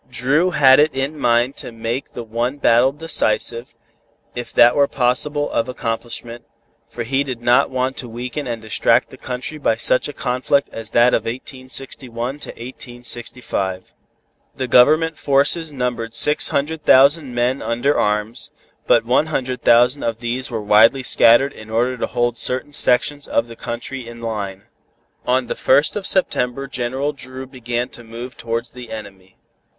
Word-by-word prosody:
Dru 135 Hz, +8 st, +1 dB
had 135 Hz, -6 st, +5 dB
it 150 Hz, +1 st, +4 dB
in 135 Hz, +3 st, -2 dB
mind 120 Hz, +3 st, +2 dB
to -, -, -7 dB
make 115 Hz, +3 st, -5 dB
the 120 Hz, -, -6 dB
one 120 Hz, +4 st, -2 dB
battle 125 Hz, -1 st, +4 dB
decisive, 120 Hz, -5 st, -1 dB, 0.6 s
if 120 Hz, 0 st, -6 dB
that 120 Hz, +1 st, +5 dB
were 140 Hz, -1 st, +4 dB
possible 145 Hz, +4 st, 0 dB
of 115 Hz, +2 st, -1 dB
accomplishment, 120 Hz, 0 st, -5 dB, 0.5 s
for 120 Hz, -, -5 dB
he 135 Hz, +4 st, 0 dB
did 130 Hz, -4 st, -5 dB
not 125 Hz, +4 st, +4 dB
want 130 Hz, 0 st, -2 dB
to 125 Hz, -, -5 dB
weaken 125 Hz, +5 st, -5 dB
and 115 Hz, -2 st, -5 dB
distract 115 Hz, +2 st, +1 dB
the 130 Hz, -, -12 dB
country 130 Hz, +4 st, -6 dB
by 115 Hz, -, +1 dB
such 115 Hz, +3 st, +1 dB
a 145 Hz, -, -7 dB
conflict 130 Hz, +2 st, 0 dB
as 115 Hz, -1 st, -5 dB
that 120 Hz, +1 st, +4 dB
of 110 Hz, -, +1 dB
1861 130 Hz, 0 st, -5 dB
to -, -, -8 dB
1865. 120 Hz, -6 st, -6 dB, 0.6 s
The 130 Hz, -, -3 dB
Government 155 Hz, +7 st, +4 dB
forces 145 Hz, +3 st, +1 dB
numbered 120 Hz, -4 st, -3 dB
six 150 Hz, +4 st, +2 dB
hundred 150 Hz, +2 st, -2 dB
thousand 140 Hz, -1 st, +4 dB
men 125 Hz, +2 st, 0 dB
under 120 Hz, +5 st, 0 dB
arms, 105 Hz, +2 st, -1 dB, 0.4 s
but 115 Hz, -1 st, +4 dB
one 130 Hz, +6 st, +2 dB
hundred 130 Hz, -4 st, -3 dB
thousand 125 Hz, +4 st, +4 dB
of 115 Hz, -1 st, -2 dB
these 125 Hz, +2 st, -3 dB
were 115 Hz, -3 st, -4 dB
widely 110 Hz, +6 st, +5 dB
scattered 125 Hz, +3 st, +5 dB
in 110 Hz, 0 st, -12 dB
order 120 Hz, +3 st, 0 dB
to 125 Hz, -, -3 dB
hold 120 Hz, -1 st, -1 dB
certain 130 Hz, +3 st, 0 dB
sections 145 Hz, +2 st, +2 dB
of 115 Hz, -, +1 dB
the 115 Hz, -1 st, -11 dB
country 120 Hz, +2 st, -6 dB
in 120 Hz, 0 st, -10 dB
line. 100 Hz, -4 st, -5 dB, 0.6 s
On 130 Hz, +1 st, +2 dB
the -, -, -3 dB
first 140 Hz, +3 st, +2 dB
of 205 Hz, -2 st, -1 dB
September 135 Hz, -8 st, +2 dB
General 130 Hz, +2 st, -2 dB
Dru 130 Hz, -1 st, -8 dB
began 120 Hz, -2 st, -4 dB
to 120 Hz, -, -11 dB
move 115 Hz, +2 st, -9 dB
towards 115 Hz, +1 st, -3 dB
the 125 Hz, -1 st, -11 dB
enemy. 95 Hz, -4 st, -10 dB
125 Hz, 165 wpm, -19 LUFS, 115-135 Hz, 0.6 s, had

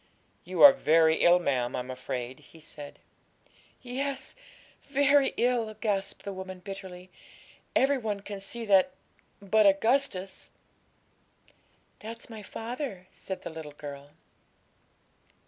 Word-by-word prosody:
'You 180 Hz, +1 st, +1 dB
are 285 Hz, -1 st, +12 dB
very 160 Hz, -, +4 dB
ill, 175 Hz, +1 st, +6 dB
ma'am, 130 Hz, -8 st, -1 dB
I'm 125 Hz, +1 st, -4 dB
afraid,' 125 Hz, 0 st, -5 dB
he 165 Hz, -, -17 dB
said. 150 Hz, -2 st, -10 dB, 0.9 s
'Yes, 265 Hz, +2 st, -4 dB, 0.5 s
very 280 Hz, 0 st, +3 dB
ill,' 235 Hz, -3 st, +1 dB
gasped 200 Hz, -3 st, -2 dB
the 200 Hz, -, -5 dB
woman 190 Hz, 0 st, -7 dB
bitterly; 185 Hz, -1 st, -9 dB, 0.6 s
'every 270 Hz, +1 st, +3 dB
one 210 Hz, -4 st, -3 dB
can 200 Hz, 0 st, -7 dB
see 230 Hz, +4 st, -6 dB
that 200 Hz, +5 st, +4 dB, 0.5 s
but 210 Hz, +1 st, +4 dB
Augustus!' 200 Hz, -1 st, +1 dB, 1.5 s
'That's 230 Hz, +2 st, -9 dB
my 220 Hz, -1 st, -8 dB
father,' 225 Hz, -2 st, -6 dB
said 190 Hz, -, -7 dB
the -, -, -6 dB
little 160 Hz, -2 st, -8 dB
girl. 145 Hz, -1 st, -9 dB
195 Hz, 115 wpm, -28 LUFS, 165-235 Hz, 1.5 s, are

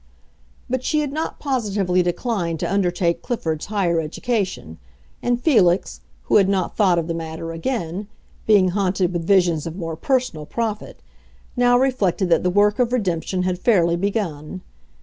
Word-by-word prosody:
But 260 Hz, 0 st, -2 dB
she 305 Hz, +3 st, +1 dB
had 290 Hz, -2 st, -3 dB
not 315 Hz, +2 st, -3 dB
positively 205 Hz, -9 st, 0 dB
declined 175 Hz, -2 st, -2 dB
to -, -, -1 dB
undertake 175 Hz, -3 st, 0 dB
Clifford's 160 Hz, -11 st, -3 dB
higher 190 Hz, -5 st, +1 dB
education, 185 Hz, -, -3 dB, 0.4 s
and 245 Hz, 0 st, 0 dB
Felix, 195 Hz, -, +2 dB, 0.2 s
who -, -, +3 dB
had 195 Hz, -2 st, +4 dB
not 190 Hz, -3 st, -1 dB
thought 190 Hz, -5 st, +3 dB
of 165 Hz, -, 0 dB
the 165 Hz, -, -3 dB
matter 165 Hz, 0 st, -5 dB
again, 180 Hz, 0 st, -3 dB, 0.4 s
being 200 Hz, -4 st, +5 dB
haunted 185 Hz, -1 st, 0 dB
with 170 Hz, -1 st, -3 dB
visions 175 Hz, -5 st, +3 dB
of 165 Hz, -, -6 dB
more 165 Hz, -4 st, -4 dB
personal 210 Hz, -, -1 dB
profit, 220 Hz, -3 st, -4 dB, 0.5 s
now 245 Hz, 0 st, +4 dB
reflected 205 Hz, -9 st, +1 dB
that 165 Hz, -, +4 dB
the 180 Hz, -, +1 dB
work 205 Hz, +3 st, +3 dB
of 245 Hz, -1 st, +2 dB
redemption 185 Hz, -5 st, -1 dB
had 180 Hz, -1 st, -1 dB
fairly 175 Hz, -6 st, +3 dB
begun. 185 Hz, -4 st, -3 dB
185 Hz, 155 wpm, -21 LUFS, 170-225 Hz, 0.5 s, being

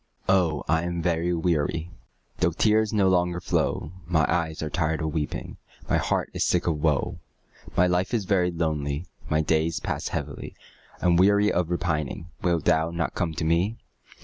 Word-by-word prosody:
Oh, 85 Hz, -7 st, +2 dB
I 80 Hz, +1 st, +2 dB
am 85 Hz, -1 st, -3 dB
very 85 Hz, 0 st, +1 dB
weary, 80 Hz, 0 st, 0 dB, 0.5 s
Though 85 Hz, 0 st, +2 dB
tears 110 Hz, +3 st, +3 dB
no 100 Hz, -3 st, +3 dB
longer 90 Hz, -1 st, +2 dB
flow; 75 Hz, -3 st, -1 dB, 0.2 s
My 80 Hz, -3 st, +3 dB
eyes 80 Hz, -1 st, -1 dB
are 80 Hz, -, -2 dB
tired 80 Hz, -2 st, 0 dB
of 80 Hz, -2 st, -2 dB
weeping, 75 Hz, -3 st, -3 dB, 0.3 s
My -, -, +2 dB
heart -, -, -1 dB
is -, -, 0 dB
sick 90 Hz, -, +1 dB
of 80 Hz, -4 st, 0 dB
woe; 75 Hz, -4 st, 0 dB, 0.6 s
My 90 Hz, -, +6 dB
life 90 Hz, +1 st, +1 dB
is 110 Hz, -5 st, 0 dB
very 90 Hz, -2 st, +2 dB
lonely 80 Hz, -2 st, -2 dB, 0.2 s
My 75 Hz, +1 st, +2 dB
days 80 Hz, +1 st, +1 dB
pass -, -, -3 dB
heavily, 70 Hz, -1 st, -5 dB, 0.5 s
I'm 85 Hz, -1 st, +4 dB
weary 100 Hz, +3 st, +4 dB
of 85 Hz, -1 st, 0 dB
repining; 85 Hz, -1 st, -2 dB
Wilt 85 Hz, -4 st, 0 dB
thou 80 Hz, +1 st, +3 dB
not 85 Hz, 0 st, -2 dB
come 80 Hz, -3 st, -2 dB
to 80 Hz, -, -2 dB
me? 90 Hz, +8 st, +1 dB
85 Hz, 175 wpm, -26 LUFS, 80-90 Hz, 0.6 s, My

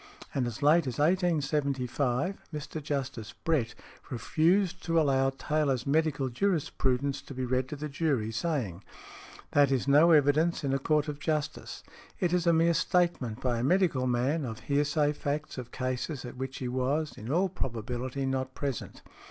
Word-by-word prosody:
And 130 Hz, -4 st, 0 dB
as 120 Hz, +3 st, -6 dB
late 155 Hz, +1 st, +5 dB
as 125 Hz, -, -3 dB
1875, 145 Hz, -3 st, 0 dB
Mr. 155 Hz, 0 st, -5 dB
Justice 135 Hz, -7 st, -4 dB
Brett 145 Hz, -9 st, -1 dB, 0.3 s
refused 170 Hz, -, +1 dB
to 165 Hz, -1 st, +3 dB
allow 135 Hz, -3 st, +3 dB
Taylor's 135 Hz, -2 st, -1 dB
Medical 145 Hz, -2 st, +1 dB
Jurisprudence 140 Hz, -3 st, 0 dB
to 140 Hz, -, -10 dB
be 130 Hz, 0 st, -2 dB
read 130 Hz, +1 st, 0 dB
to 150 Hz, -, -4 dB
the 150 Hz, +1 st, -5 dB
jury, 140 Hz, -7 st, 0 dB
saying: 115 Hz, -, -2 dB, 0.7 s
"That 145 Hz, -2 st, +4 dB
is 135 Hz, -1 st, 0 dB
no 150 Hz, +4 st, +6 dB
evidence 155 Hz, +2 st, +4 dB
in 135 Hz, -1 st, 0 dB
a 135 Hz, -, +1 dB
court 150 Hz, +1 st, +1 dB
of 150 Hz, -1 st, -5 dB
justice. 150 Hz, 0 st, -3 dB, 0.4 s
It 175 Hz, -1 st, +1 dB
is 180 Hz, -1 st, +1 dB
a -, -, +7 dB
mere 165 Hz, +1 st, +4 dB
statement 165 Hz, -9 st, 0 dB
by 120 Hz, -2 st, 0 dB
a -, -, -1 dB
medical 160 Hz, -5 st, +2 dB
man 130 Hz, +6 st, +1 dB
of 115 Hz, -4 st, -5 dB
hearsay 145 Hz, +1 st, +1 dB
facts 145 Hz, -1 st, -3 dB
of 120 Hz, -1 st, -8 dB
cases 130 Hz, +2 st, -3 dB
at 120 Hz, -, -8 dB
which 130 Hz, +1 st, -5 dB
he 125 Hz, -, -4 dB
was, 135 Hz, +5 st, -1 dB
in 110 Hz, +5 st, -6 dB
all 180 Hz, +5 st, +3 dB
probability, 125 Hz, -, -4 dB
not 130 Hz, -1 st, -2 dB
present. 140 Hz, -5 st, -4 dB
140 Hz, 165 wpm, -29 LUFS, 130-155 Hz, 0.7 s, a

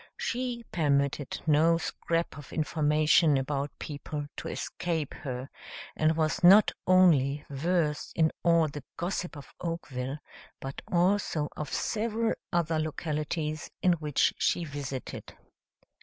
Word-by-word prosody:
She 245 Hz, -1 st, -2 dB
permitted 140 Hz, -3 st, 0 dB
no 160 Hz, +2 st, +4 dB
scrap 165 Hz, 0 st, -2 dB
of 145 Hz, -, -11 dB
information 155 Hz, 0 st, +3 dB
about 140 Hz, +1 st, -1 dB
people 145 Hz, 0 st, -5 dB
to -, -, -5 dB
escape 165 Hz, -5 st, -3 dB
her, 130 Hz, -3 st, -5 dB, 0.5 s
and 155 Hz, +1 st, +2 dB
was 160 Hz, +4 st, 0 dB
not 195 Hz, +4 st, +8 dB, 0.2 s
only 150 Hz, -6 st, +4 dB
versed 150 Hz, +1 st, 0 dB
in 160 Hz, -1 st, +3 dB
all 170 Hz, -2 st, +4 dB
the 145 Hz, -1 st, -7 dB
gossip 175 Hz, -2 st, -3 dB
of 140 Hz, -, -12 dB
Oakville, 145 Hz, -6 st, -4 dB, 0.4 s
but 135 Hz, +1 st, -6 dB
also 175 Hz, -4 st, +2 dB
of 150 Hz, -, -5 dB
several 225 Hz, +1 st, 0 dB, 0.2 s
other 165 Hz, -2 st, +1 dB
localities 155 Hz, 0 st, -3 dB
in 180 Hz, -, +5 dB
which 150 Hz, -4 st, +1 dB
she 175 Hz, -, +1 dB
visited. 140 Hz, -3 st, -6 dB
155 Hz, 120 wpm, -29 LUFS, 145-175 Hz, 0.5 s, not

